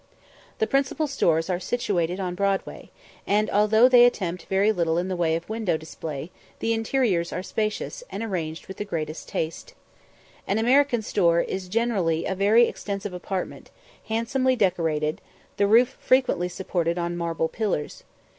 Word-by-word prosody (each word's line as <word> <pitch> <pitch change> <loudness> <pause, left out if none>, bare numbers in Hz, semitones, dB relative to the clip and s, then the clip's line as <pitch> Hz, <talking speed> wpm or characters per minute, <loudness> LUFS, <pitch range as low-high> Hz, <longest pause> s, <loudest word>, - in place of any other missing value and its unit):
The 445 - +2
principal 275 -2 0
stores 165 - +1
are 180 -2 -1
situated 185 -6 -1
in 180 -2 -2
Broadway; 195 +1 -2 0.4
and 210 +1 +2
although 215 +3 +5
they 250 -1 +7
attempt 180 -8 +1
very 195 +3 +3
little 170 -5 0
in 180 +2 -1
the 185 - -1
way 165 -2 +1
of 165 +1 -5
window 220 -6 -1
display, 160 0 -7 0.3
the 230 - 0
interiors 225 -6 0
are 180 - -4
spacious, 215 - -3
and 210 - -5
arranged 165 -7 -4
with 190 - -8
the - - -2
greatest 155 -5 -5
taste. 165 - -4 0.7
An 200 - +1
American 250 +1 +3
store 170 -5 +2
is 190 -1 -4
generally 190 -7 0
a - - -1
very 210 +5 +4
extensive 200 -1 -5
apartment, 180 +1 -5 0.4
handsomely 255 +4 +1
decorated, 165 -7 0 0.4
the 200 - +3
roof 240 +5 +4
frequently 255 -9 +2
supported 175 -2 -2
on 175 0 -2
marble 165 -1 -1
pillars. 195 -7 -3
195 Hz, 155 wpm, -25 LUFS, 170-225 Hz, 0.7 s, they